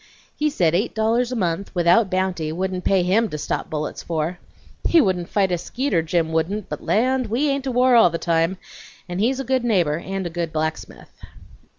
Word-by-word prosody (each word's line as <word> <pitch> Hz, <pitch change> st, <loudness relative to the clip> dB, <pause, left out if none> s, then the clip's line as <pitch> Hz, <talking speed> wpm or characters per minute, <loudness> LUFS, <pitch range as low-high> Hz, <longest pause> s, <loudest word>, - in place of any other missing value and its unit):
He 300 Hz, 0 st, +1 dB
said 175 Hz, -, +1 dB
eight 200 Hz, +8 st, 0 dB
dollars 230 Hz, +3 st, +1 dB
a -, -, -2 dB
month, 190 Hz, -2 st, -2 dB
without 180 Hz, +4 st, +4 dB
bounty, 185 Hz, -4 st, -1 dB
wouldn't 185 Hz, +2 st, -3 dB
pay 190 Hz, -2 st, +2 dB
HIM 210 Hz, +5 st, +2 dB
to 150 Hz, -, -5 dB
stop -, -, -3 dB
bullets 150 Hz, -1 st, -4 dB
for. 165 Hz, +2 st, -3 dB, 0.5 s
He 340 Hz, -, +6 dB
wouldn't 185 Hz, -, +1 dB
fight 195 Hz, -3 st, +1 dB
a 175 Hz, -, 0 dB
skeeter, 245 Hz, -2 st, -1 dB
Jim 165 Hz, 0 st, -1 dB
wouldn't, 175 Hz, +6 st, -1 dB
but -, -, -5 dB
land! 255 Hz, +2 st, +1 dB
we 245 Hz, +8 st, 0 dB
ain't 275 Hz, -1 st, -1 dB
to 265 Hz, -, -1 dB
war 250 Hz, +1 st, +3 dB
all 225 Hz, -6 st, +7 dB
the 165 Hz, -, -3 dB
time, 165 Hz, +2 st, 0 dB, 0.5 s
and 175 Hz, 0 st, -4 dB
he's 255 Hz, +5 st, +1 dB
a -, -, -2 dB
good 260 Hz, 0 st, 0 dB
neighbor 175 Hz, -10 st, +1 dB
and 195 Hz, +1 st, -4 dB
a 170 Hz, -, -4 dB
good 170 Hz, -1 st, -3 dB
blacksmith." 160 Hz, 0 st, -5 dB
190 Hz, 205 wpm, -22 LUFS, 170-235 Hz, 0.5 s, all